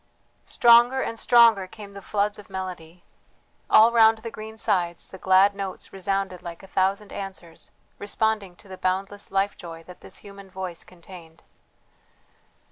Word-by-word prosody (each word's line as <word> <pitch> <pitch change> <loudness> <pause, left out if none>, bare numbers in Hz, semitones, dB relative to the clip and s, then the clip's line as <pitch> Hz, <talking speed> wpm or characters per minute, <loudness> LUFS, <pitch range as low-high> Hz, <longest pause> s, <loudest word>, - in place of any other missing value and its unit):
Stronger 240 +2 +5
and 230 - -4
stronger 230 -5 +5
came 200 +1 -12
the 200 - -9
floods 205 +1 -1
of 205 - -14
melody; 180 -3 -7 0.7
all 225 +2 +7
round 225 -1 +5
the 225 +1 -8
green 220 0 -9
sides 180 -6 -1
the 190 - -12
glad 190 +2 +4
notes 195 -2 -6
resounded 195 -1 -2
like 170 0 -9
a - - -12
thousand 195 +2 -1
answers, 190 -4 -8 0.3
responding 205 -2 -1
to 200 - -19
the 185 -1 -10
boundless 195 +2 -2
life 195 +1 0
joy 165 -1 -10
that 180 +2 -14
this - - -8
human 200 -1 -12
voice 185 -2 -6
contained. 170 -2 -15
195 Hz, 150 wpm, -24 LUFS, 185-210 Hz, 0.7 s, all